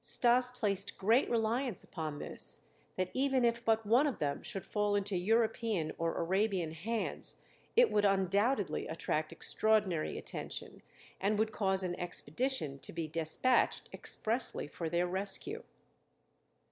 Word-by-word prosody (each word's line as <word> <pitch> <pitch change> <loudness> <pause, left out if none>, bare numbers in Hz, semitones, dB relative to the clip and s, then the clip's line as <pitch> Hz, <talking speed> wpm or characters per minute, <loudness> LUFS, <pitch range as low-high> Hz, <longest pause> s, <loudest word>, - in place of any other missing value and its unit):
Stas 245 +1 +5
placed 200 -5 -1
great 225 +7 +3
reliance 235 -1 0
upon 155 -4 -5
this, - - -4 0.3
that 185 -1 -2
even 265 -2 +2
if 235 0 +1
but 225 -1 +2
one 245 +8 +4
of 280 - -2
them 145 -1 -2
should 195 -6 -4
fall 210 -1 0
into 200 -1 -1
European 215 -3 +1
or 165 0 0
Arabian 190 -1 0
hands 215 +8 -3 0.4
it 485 0 +6
would 210 - +2
undoubtedly 200 +5 +1
attract - - -2
extraordinary 210 -7 +1
attention - - -6 0.4
and 205 +2 +1
would 220 +1 +1
cause 190 -2 0
an 180 -1 -2
expedition 175 - -2
to - - -5
be 165 -1 -4
despatched 165 +11 +1
expressly 230 - +1
for 165 +2 -5
their 175 +2 +1
rescue. 190 +2 +1
205 Hz, 135 wpm, -33 LUFS, 175-235 Hz, 0.4 s, it